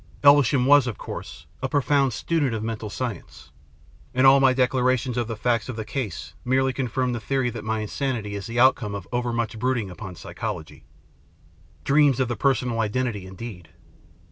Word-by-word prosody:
Elvesham 140 -2 +5
was, 145 -1 +6
of 110 - -4
course, - - -8 0.2
a 130 - -2
profound 140 -2 +2
student 140 +1 0
of 110 - -4
mental 110 -1 -4
science, 120 -3 -6 0.6
and 130 +1 +4
all 135 +1 +8
my 135 -1 +5
declarations 130 -1 +1
of 120 -2 -1
the 115 - -4
facts 115 +2 0
of 125 - -4
the 110 -1 -5
case 100 - -5
merely 130 +1 +1
confirm 130 0 -1
the 120 - -3
theory 125 +2 -1
that 115 -1 -7
my 110 0 -1
insanity 110 -2 -3
is 100 +1 -5
the 115 +1 -2
outcome 120 -5 +3
of 100 - -7
overmuch 120 -2 -2
brood 130 +2 +1
ing 100 -5 -4
upon 95 -1 -8
psychology. 85 -1 -6 1.0
Dreams 140 -2 +4
of 130 -2 +1
the 120 - -1
personal 125 -4 +1
identity 110 -3 -1
indeed 95 -3 -9
120 Hz, 175 wpm, -24 LUFS, 110-130 Hz, 1.0 s, all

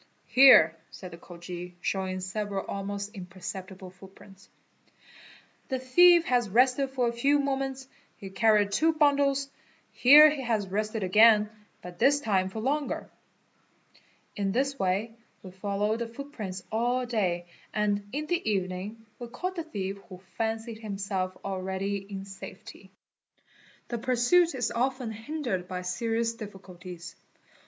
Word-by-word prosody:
"Here" 250 -12 +7
said 185 -2 -10
the 170 - -10
Khoji, 175 0 -9
showing 185 0 -2
several 200 +1 -3
almost 200 +1 -5
impercep 185 -1 -7
tible 185 -1 -11
footprints, 195 +1 -16 1.2
"the 260 - -1
thief 340 +7 +5
has 245 -4 +1
rested 255 +5 +3
for 255 -2 0
a 235 - -1
few 275 +5 +2
moments, 270 -1 -2 0.3
he 195 -1 -9
carried 210 -1 +3
two 320 +10 +2
bundles. 280 -2 +2 0.4
Here 295 +4 +8
he 290 -2 -4
has 225 -5 -1
rested 215 +2 -2
again, 210 +2 +5 0.3
but 180 -1 -10
this 285 +1 +4
time 190 -7 0
for 220 +3 -6
longer." 285 +4 -2 1.2
In 200 -1 -1
this 275 +5 -1
way 195 +5 -1 0.3
we 185 - -10
followed 205 +3 -2
the 235 - -3
footprints 230 -7 -7
all 245 +3 0
day 185 -7 -1 0.3
and 205 -1 -1
in 300 +3 -3
the 350 +2 -1
evening 195 +3 -3
we 240 - -6
caught 365 +11 -5
the 335 - -3
thief 200 -10 -5
who 185 - -9 0.2
fancied 225 0 -3
himself 195 -3 -3
already 190 +1 -3
in 195 0 -8
safety. 195 0 -11 1.0
The 235 - -3
pursuit 260 +8 +3
is 245 -3 -1
often 255 -1 -1
hindered 225 - -4
by 180 0 -5
serious 230 +5 -1
difficulties. 185 -5 -10
215 Hz, 135 wpm, -28 LUFS, 190-255 Hz, 1.2 s, Here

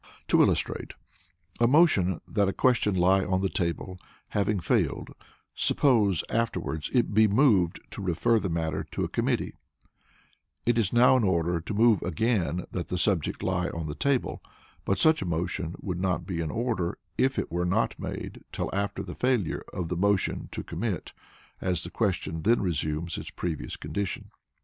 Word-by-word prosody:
To - - +5
illustrate: - - 0 0.6
a 120 - +5
motion 120 - +4
that 100 -2 +1
a 95 - 0
question 115 -5 +2
lie 95 +2 +4
on 95 +1 0
the 95 - +1
table 90 +1 -3 0.3
having 105 0 0
failed, - - 0 0.4
suppose 105 - +3
afterwards 90 -9 -2
it 120 -4 +1
be 110 +1 +6
moved 100 - +3
to - - -7
refer 100 +6 +2
the 100 - -3
matter 80 -1 -1
to - - -1
a - - 0
committee, - - -1 1.1
it 120 0 +3
is 105 -5 +1
now 125 +2 +6
in 125 - +1
order 85 -3 +1
to 95 - -5
move 110 -2 +4
again 90 -2 0
that 90 - -4
the 90 - -2
subject 90 -4 0
lie 90 -1 0
on 85 -1 -5
the 75 - -4
table; 135 - 0 0.4
but 100 - +1
such 155 +9 +4
a - - -2
motion 85 +1 -2
would 90 -3 -3
not 90 -1 -1
be 85 -3 -3
in 80 -2 -2
order, 110 -4 -1 0.2
if 130 +1 +2
it - - -2
were 85 +1 0
not 90 +1 0
made - - -6
till - - -3
after 100 +1 -2
the - - -7
failure 125 -9 0
of 85 -3 -4
the 90 - -1
motion 100 +2 0
to - - -5
commit, - - -4 0.5
as 90 -2 -1
the - - -7
question 85 -7 -1
then 115 +7 +3
resumes 80 -2 -2
its - - -7
previous 85 -4 -4
condition. 100 -2 -4
95 Hz, 175 wpm, -27 LUFS, 85-110 Hz, 1.1 s, be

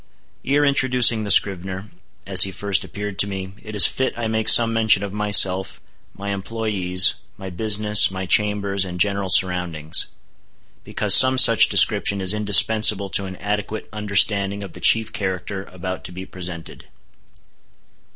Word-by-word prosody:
Ere 145 +2 0
introducing 125 -5 +1
the - - -6
scrivener, 95 0 0 0.3
as - - +5
he 95 - +2
first 95 +2 -3
appeared 105 -1 -9
to 100 - 0
me, 95 -1 -8
it 110 -1 -11
is 100 - +6
fit 130 -2 -3
I 120 -1 -4
make 110 0 -1
some 115 -1 +5
mention 110 -3 +1
of 100 -1 -7
myself, 95 -2 +2 0.4
my 100 0 -8
employés, 100 -3 0 0.2
my 95 -1 -10
business, 105 +2 +1
my 95 0 -7
chambers, 100 0 -1
and 90 -1 -8
general 100 -1 -2
surroundings; 90 -4 -1 0.8
because - - +1
some 130 0 +6
such 115 -3 +5
description 100 - +2
is 95 +1 0
indispensable 105 -1 +2
to 100 - 0
an 95 -1 -9
adequate 105 +2 -6
understanding 100 -1 -1
of 95 - -11
the - - -12
chief 110 -1 +1
character 95 0 -6
about 95 0 -8
to - - -9
be 95 +1 -10
presented. 90 -3 -10
100 Hz, 150 wpm, -19 LUFS, 95-110 Hz, 0.8 s, is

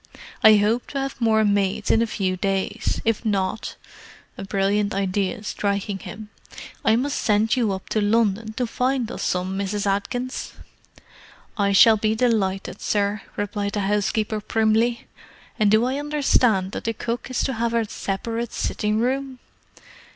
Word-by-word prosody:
I 220 0 +9
hope 215 +4 +1
to 275 - -4
have 270 -1 -4
more 220 -1 +3
maids 205 +1 +1
in 225 - +4
a 230 - +1
few 190 -4 -1
days; 195 +1 -1
if 225 0 +1
not"—a 200 -1 -5
brilliant 200 +1 0
idea 195 +3 -1
striking 200 -1 -2
him—"I 215 +2 -4
must 275 +4 -1
send 215 +2 +2
you 235 -5 +1
up 190 - -7
to 215 - 0
London 220 0 +1
to 250 +2 -1
find 250 0 -1
us - - -6
some, 185 +1 -1
Mrs. 200 +1 -2
Atkins." 245 +6 -2 1.0
"I 200 -2 +1
shall 220 +3 +7
be 215 +1 0
delighted, 205 -5 0
sir," 205 0 0 0.2
replied 205 0 -2
the 205 - -1
housekeeper 210 +2 0
primly. 225 +2 +1 0.5
"And 210 -1 +4
do 220 +3 +4
I 265 +3 -1
understand 255 -10 +2
that - - -6
the 225 - 0
cook 235 +4 -4
is 255 - -1
to 265 - -1
have 235 0 -1
a 230 -2 +1
separate 225 +4 -4
sitting 210 0 -1
room?" 260 +2 -1
215 Hz, 150 wpm, -23 LUFS, 200-235 Hz, 1.0 s, I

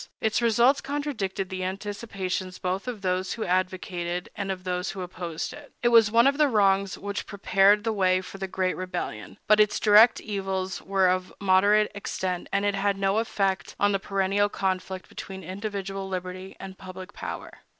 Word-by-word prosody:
Its 220 +1 +1
results 235 +4 +4
contradicted 265 -10 -3
the 185 -1 -4
anticipations 190 -1 -4
both 185 +4 -3
of 225 -5 -5
those 185 0 0
who 225 - -4
advocated 180 -1 -2
and 200 -2 -3
of 185 -1 -5
those 180 0 -2
who 190 - -5
opposed 175 -2 -5
it. 290 -1 -13
It 240 - +5
was 230 -3 +6
one 230 +2 +5
of 280 +2 +3
the 300 - +6
wrongs 195 -5 +2
which 200 0 -5
prepared 200 0 +3
the 225 -1 0
way 185 -2 +3
for 185 +1 -9
the 190 - -3
great 185 0 -1
rebellion; 110 - -5
but 215 0 +5
its 210 -1 +3
direct 215 +2 +7
evils 190 -2 -3
were 195 -1 +2
of 185 0 0
moderate 200 +2 +4
extent, 185 -3 -3
and 200 +1 +1
it 205 - +2
had 200 0 0
no 195 +2 +1
effect 195 -4 -1
on 205 0 +3
the 195 - +1
perennial 195 +1 +1
conflict 190 -1 -3
between 190 -1 -8
individual 195 +1 -5
liberty 185 0 -5
and 190 0 -9
public 185 -1 -9
power. - - -7
195 Hz, 180 wpm, -26 LUFS, 185-205 Hz, -, direct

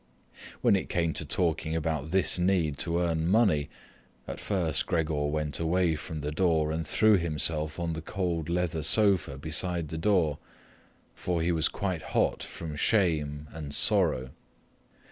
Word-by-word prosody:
When - - +4
it 95 - -3
came 85 -2 0
to 80 - -3
talking 80 0 -1
about 80 -2 -2
this 95 0 +2
need 90 -6 +1
to 85 -1 0
earn 85 -2 0
money, 95 -8 +2 0.6
at - - -6
first 85 -8 -1
Gregor 80 -3 0
went 75 0 -3
away 85 0 +1
from 75 0 -6
the 75 +1 -3
door 80 -2 +1
and 80 -1 -3
threw 110 +3 +4
himself 80 -1 -1
on 85 -1 -2
the 80 - -5
cool 85 -1 -2
leather 85 -2 -1
sofa 95 -6 +3
beside 80 +2 -1
the 80 - -5
door, 85 -6 +1 0.7
for 85 -2 -2
he 85 - +1
was 80 -1 +2
quite 95 -5 -3 0.2
hot - - +1
from 80 -3 -7
shame 75 -6 0
and 75 -3 -6
sorrow. 65 0 +3
80 Hz, 155 wpm, -28 LUFS, 75-90 Hz, 0.7 s, When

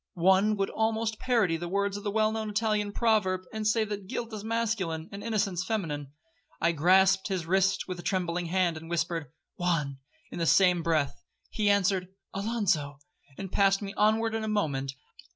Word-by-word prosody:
One 190 +4 +4
would 195 0 -1
almost 220 0 -1
parody 220 -10 +2
the 175 +1 -5
words 200 +2 0
of 205 - -6
the 205 - -1
well 215 +1 +2
known 220 -1 -3
Italian 210 -1 0
proverb, 205 -5 +1
and 215 -1 -2
say 220 +1 +3
that 205 -2 -5
guilt 230 +3 -4
is 210 -1 -5
masculine, 215 -8 -1
and 200 +1 -7
innocence 205 -6 0
feminine. 155 -9 -3 0.5
I 170 - +3
grasped 190 +4 +4
his 185 -5 -2
wrist 190 +2 +1
with 185 -1 -5
a - - -5
trembling 175 -2 -1
hand, 175 -2 +1
and 165 +1 -10
whispered—'Juan,' 165 -2 -2 0.3
in - - -6
the 165 - 0
same 180 -1 +5
breath. 155 -4 0 0.3
He 210 -2 +1
answered—'Alonzo,' 195 -4 0 0.4
and 195 -2 -6
passed 195 0 +3
me 200 0 -5
onward 220 +1 +2
in 225 0 -2
a - - -2
moment. 145 -11 -1
195 Hz, 170 wpm, -28 LUFS, 170-215 Hz, 0.5 s, same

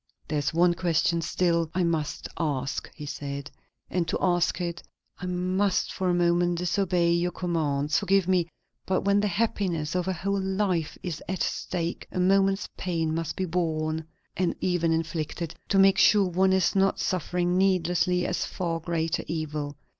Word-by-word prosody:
"There 150 -1 0
is 145 - 0
one 175 +1 +4
question 170 -1 +1
still 170 0 +1
I 185 - +2
must 160 -3 -1
ask," 140 -5 -2
he 150 - -7
said; 140 0 -5 0.4
"and 175 -2 -1
to - - 0
ask 175 -1 +1
it, 170 -1 -3 0.4
I 180 - -5
must 185 +2 0
for 185 -1 -1
a - - +3
moment 175 0 +2
disobey 180 -1 +1
your 170 +1 +1
commands. 150 -5 0
Forgive 195 -1 +2
me; 180 -3 +2 0.4
but 190 - +1
when 200 0 +3
the 210 - +1
happiness 185 -6 -1
of 180 0 -1
a 190 - +1
whole 195 +3 -1
life 190 -4 -1
is 170 -5 -4
at 190 -1 -1
stake, 170 -1 -3
a - - -3
moment's 195 +1 +3
pain 165 -4 -1
must 165 -1 -2
be 190 - -1
borne 160 -2 -1 0.3
and 180 -1 0
even 175 -3 +1
inflicted 165 0 -2 0.2
to 195 - +2
make 195 0 +6
sure 205 -3 +5
one 190 +2 +2
is 190 +1 +2
not 195 0 +2
suffering 180 -1 0
needlessly 180 -1 +2
a - - -1
far 170 -2 -2
greater 165 -1 -1
evil. 150 -2 -3
175 Hz, 170 wpm, -27 LUFS, 165-185 Hz, 0.4 s, make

